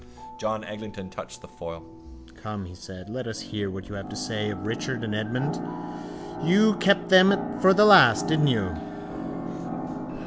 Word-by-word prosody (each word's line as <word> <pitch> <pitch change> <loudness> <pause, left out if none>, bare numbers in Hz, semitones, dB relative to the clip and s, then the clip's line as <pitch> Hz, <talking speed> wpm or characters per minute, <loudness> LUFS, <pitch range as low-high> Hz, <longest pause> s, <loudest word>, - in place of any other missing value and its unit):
John 110 -1 -2
Eglinton 105 -3 -9
touched - - -9
the - - -13
foil. 85 -1 -9 0.5
—Come, 100 +4 -7
he 90 - -11
said. 90 +1 -11
Let 125 +3 -5
us 110 -2 -5
hear 105 -2 -4
what 95 0 -8
you 105 - -9
have 100 0 -7
to - - -7
say 105 -2 -3
of 100 -1 -6
Richard 115 +2 -3
and 110 -2 -3
Edmund. 120 +7 -2 0.8
You 205 +7 +4
kept 195 0 +3
them 190 +1 +5
for 190 - +6
the 210 +2 +6
last, 195 -4 +8
didn't 155 -1 +3
you? 100 - 0
110 Hz, 165 wpm, -26 LUFS, 100-150 Hz, 0.8 s, last